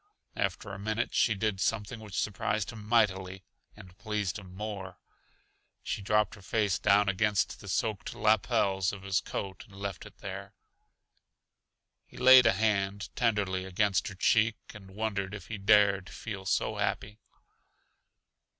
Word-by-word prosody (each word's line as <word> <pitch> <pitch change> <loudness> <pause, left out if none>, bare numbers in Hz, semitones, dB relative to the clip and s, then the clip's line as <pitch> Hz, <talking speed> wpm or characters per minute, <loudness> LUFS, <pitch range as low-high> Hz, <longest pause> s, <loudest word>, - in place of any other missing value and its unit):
After 100 - -2
a 95 - -7
minute 110 +3 -2
she 110 - +3
did 100 -1 -1
something 115 +2 -1
which 105 -4 -5
surprised 105 0 -1
him 105 -2 -10
mightily 95 -5 +1 0.3
and 95 -4 -14
pleased 105 -3 -2
him 95 -2 -13
more: 100 -3 -6 0.9
she - - -3
dropped 105 0 +2
her 100 - -12
face 105 0 0
down 100 0 +4
against 100 +1 +1
the 100 - -12
soaked 105 +1 -2
lapels 100 -3 +2
of 95 -2 -9
his 95 -1 +1
coat, 95 -2 -5
and 100 - -16
left 100 -2 -5
it - - -17
there. - - -8 1.5
He - - -16
laid 130 -1 +8
a 115 - +5
hand 100 -1 0
tenderly 105 -6 0
against 95 +1 +1
her 95 - -7
cheek 110 +3 +3 0.2
and 100 -3 -12
wondered 100 -2 -2
if 100 - -10
he 110 - -5
dared 100 -2 +4
feel 100 -4 -7
so - - 0
happy. 105 +1 -2
100 Hz, 150 wpm, -30 LUFS, 95-110 Hz, 1.5 s, laid